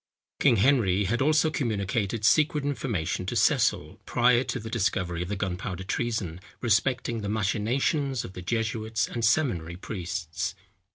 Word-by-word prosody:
King - - +5
Henry 105 -4 +3
had 115 +6 0
also 155 +2 +3
communicated 110 -4 -1
secret 150 +3 +3
information 100 - -2
to - - -2
Cecil, - - +2
prior 120 +1 +4
to 125 - -3
the 110 - -8
discovery 90 -6 -1
of 90 - -4
the 105 - -1
Gunpowder 95 -1 -3
Treason, 100 -4 -2 0.2
respecting 120 +1 +1
the 100 - -3
machinations 120 +6 0
of 95 - -9
the 90 - -7
jesuits 110 +2 -1
and 115 - -4
seminary 110 - +1
priests. 85 -5 -4
110 Hz, 145 wpm, -27 LUFS, 95-125 Hz, 0.2 s, King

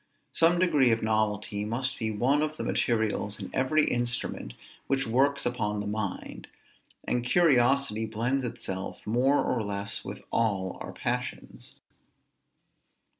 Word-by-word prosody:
Some 165 +1 +4
degree 150 -8 +4
of 115 -1 +1
novelty 105 -1 0
must 130 +5 -2
be 110 - -1
one 125 +8 +2
of 155 0 -2
the - - -3
materials 110 -3 0
in - - -7
every 150 +4 +3
instrument 120 - -2 0.3
which 135 0 +1
works 140 +5 +2
upon 105 -4 -1
the 105 - -3
mind; 105 -2 -4 0.6
and 120 - 0
curiosity 130 -6 +3
blends 120 +5 -1
itself 95 -5 -5
more 125 +6 +2
or 120 - 0
less 100 -1 -3
with - - -7
all 100 -5 0
our - - -6
passions. - - -5
115 Hz, 130 wpm, -28 LUFS, 105-135 Hz, 0.6 s, Some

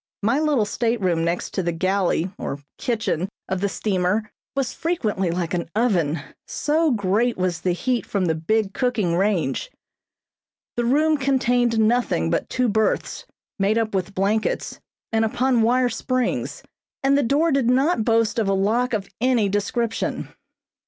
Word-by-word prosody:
My 230 +7 +2
little 295 -8 +2
stateroom 205 -7 0
next 170 +1 -2
the 170 - 0
galley 185 0 0
or 140 - -3 0.2
kitchen 215 - -1 0.2
of 190 -1 -2
the 200 - +1
steamer 200 +2 -1 0.2
was 270 -3 -1
frequently 220 - -1
like 170 0 -2
an 170 -2 -2
oven, 175 -10 +1 0.3
so 315 +2 +1
great 225 +1 +1
was 185 -2 -1
the 180 - +1
heat 240 +4 -1
from 195 -3 0
the 165 - +2
big 195 +6 0
cooking 220 -9 0
range. 190 - 0 1.1
The 240 - 0
room 305 +5 +3
contained 245 -3 +2
nothing 220 - +2
but - - -1
two 255 -1 +1
berths, 220 0 0 0.3
made 200 +3 +2
up 225 -2 0
with 190 0 -2
blankets 205 +3 -1 0.3
and 225 0 +2
upon 245 +2 +2
wire 250 +3 +3
springs, 255 +1 -2 0.4
and 275 +1 +4
the 285 - +3
door 290 +6 +2
did 270 -4 +2
not 265 0 +2
boast 225 0 +2
of 215 - +1
a - - +3
lock 230 +6 +1
of 200 -3 -1
any 245 -5 +3
description. 225 +3 -2
220 Hz, 150 wpm, -23 LUFS, 190-250 Hz, 1.1 s, and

